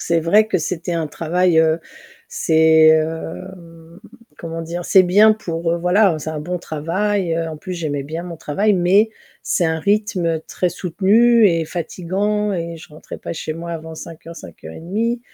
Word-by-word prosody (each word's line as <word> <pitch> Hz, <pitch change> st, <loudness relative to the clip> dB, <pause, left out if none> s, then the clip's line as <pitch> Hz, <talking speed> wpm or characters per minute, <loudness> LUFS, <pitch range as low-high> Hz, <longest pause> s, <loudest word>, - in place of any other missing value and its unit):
C'est 170 Hz, -1 st, +1 dB
vrai 205 Hz, +7 st, +4 dB
que 220 Hz, -, 0 dB
c'était 170 Hz, +1 st, -3 dB
un 165 Hz, -2 st, -1 dB
travail, 165 Hz, +3 st, +1 dB
heu, 160 Hz, 0 st, +3 dB, 0.5 s
c'est, 160 Hz, 0 st, +4 dB
heu, 160 Hz, +3 st, -4 dB
hem, 165 Hz, -1 st, -15 dB, 0.4 s
comment 165 Hz, 0 st, -6 dB
dire? 170 Hz, +2 st, -5 dB
C'est 190 Hz, -, +6 dB
bien 205 Hz, +4 st, +5 dB
pour, 170 Hz, -5 st, -3 dB
heu, -, -, 0 dB
voilà, 180 Hz, 0 st, +3 dB
c'est 155 Hz, -, -5 dB
un 155 Hz, -1 st, -5 dB
bon 180 Hz, +4 st, -4 dB
travail, 175 Hz, +4 st, -2 dB
heu, 165 Hz, 0 st, -2 dB
en 155 Hz, -1 st, -7 dB
plus 185 Hz, +4 st, -6 dB
j'aimais 150 Hz, -5 st, -3 dB
bien 160 Hz, +4 st, -6 dB
mon 175 Hz, -1 st, -8 dB
travail 195 Hz, +8 st, 0 dB
mais 195 Hz, +4 st, +3 dB, 0.3 s
c'est 175 Hz, -, 0 dB
un 160 Hz, 0 st, -1 dB
rythme 195 Hz, -4 st, 0 dB
très 180 Hz, -, -1 dB
soutenu 210 Hz, +7 st, +3 dB
et 165 Hz, -4 st, +1 dB
fatigant 195 Hz, +5 st, -2 dB
et 170 Hz, -1 st, -4 dB
je -, -, -13 dB
rentrais 150 Hz, +1 st, -11 dB
pas -, -, -6 dB
chez 155 Hz, -, -4 dB
moi 170 Hz, +2 st, -7 dB
avant 160 Hz, 0 st, -7 dB
05:00-05:30 170 Hz, -, -6 dB
170 Hz, 170 wpm, -19 LUFS, 160-190 Hz, 0.5 s, C'est